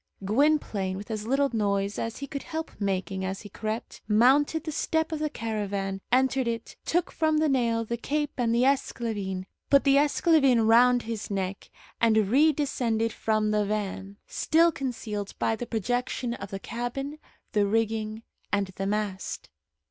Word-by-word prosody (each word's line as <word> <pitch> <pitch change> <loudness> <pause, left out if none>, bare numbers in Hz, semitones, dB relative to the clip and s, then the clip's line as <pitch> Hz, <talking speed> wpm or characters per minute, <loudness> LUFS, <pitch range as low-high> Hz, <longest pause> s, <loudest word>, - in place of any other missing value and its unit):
Gwynplaine, 215 -6 +1
with 205 +3 -7
as 215 0 -4
little 275 +2 +2
noise 200 -1 0
as 230 0 -3
he 280 - -5
could 280 0 -5
help 320 0 -5
making 190 -1 -1
as 190 +1 -3
he 205 - -10
crept, 220 +3 -5
mounted 270 +8 +4
the 315 - -4
step 320 +2 0
of 315 - -2
the 305 0 0
caravan, 200 -6 -3
entered 260 0 +3
it, 230 -1 -4
took 350 +1 0
from 315 -1 +1
the 310 0 +3
nail 235 -4 +1
the 235 +2 -3
cape 295 +4 -1
and 240 -2 +1
the 235 +2 +3
esclavine, 215 -8 -1 0.2
put 280 -1 +5
the 275 -1 +5
esclavine 280 -5 +4
round 245 +2 +5
his 225 -2 -5
neck, 195 -1 -3 0.3
and 230 -1 +4
redescended 235 -1 +2
from 215 -1 0
the 210 0 +2
van, 200 -1 -3
still 335 +2 +3
concealed 225 -8 -4
by 225 - +1
the 240 +2 -6
projection 245 +2 -1
of 200 -4 -7
the 195 - -5
cabin, 270 +7 -4 0.3
the 205 -2 +2
rigging, 220 0 -1 0.3
and 200 -2 0
the 195 - -2
mast. 205 -2 -3
230 Hz, 165 wpm, -27 LUFS, 205-275 Hz, 0.3 s, put